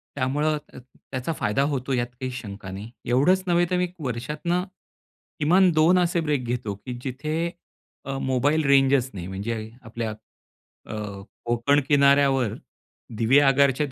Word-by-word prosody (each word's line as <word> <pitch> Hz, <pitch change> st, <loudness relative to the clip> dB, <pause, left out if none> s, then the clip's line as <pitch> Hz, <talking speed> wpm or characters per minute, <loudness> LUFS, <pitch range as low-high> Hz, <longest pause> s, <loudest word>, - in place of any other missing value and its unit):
त्यामुळं 145 Hz, +3 st, 0 dB
त 150 Hz, -, -16 dB
त्याचा 130 Hz, +3 st, -6 dB
फायदा 125 Hz, +2 st, +1 dB
होतो, 135 Hz, 0 st, -2 dB
यात 120 Hz, -1 st, 0 dB
काही 130 Hz, -1 st, -3 dB
शंका 100 Hz, -5 st, -7 dB
नाही. 105 Hz, +4 st, -8 dB
एवढंच 155 Hz, +10 st, +3 dB
नव्हे 175 Hz, 0 st, +3 dB
तर 180 Hz, -, +2 dB
मी 180 Hz, 0 st, +1 dB
वर्षातनं 150 Hz, +7 st, -2 dB, 0.8 s
किमान 180 Hz, +5 st, +5 dB
2 165 Hz, +4 st, +4 dB
असे 175 Hz, -1 st, +1 dB
ब्रेक 145 Hz, -5 st, -1 dB
घेतो 120 Hz, -4 st, -3 dB
की 125 Hz, -, -4 dB
जिथे 155 Hz, +6 st, -2 dB, 0.6 s
अ, 135 Hz, 0 st, -3 dB
मोबाईल 140 Hz, +4 st, +1 dB
रेंजच 135 Hz, -2 st, +4 dB
नाही. 90 Hz, -3 st, -6 dB
म्हणजे 100 Hz, +5 st, -3 dB
अ 110 Hz, +3 st, -9 dB
आपल्या 115 Hz, -1 st, -4 dB, 0.8 s
अ, 110 Hz, -, -4 dB, 0.5 s
कोकण 120 Hz, +5 st, +2 dB
किनाऱ्यावर 140 Hz, -5 st, +4 dB, 0.6 s
दिवेआगारच्या 135 Hz, +3 st, +4 dB
135 Hz, 140 wpm, -24 LUFS, 120-150 Hz, 0.8 s, किमान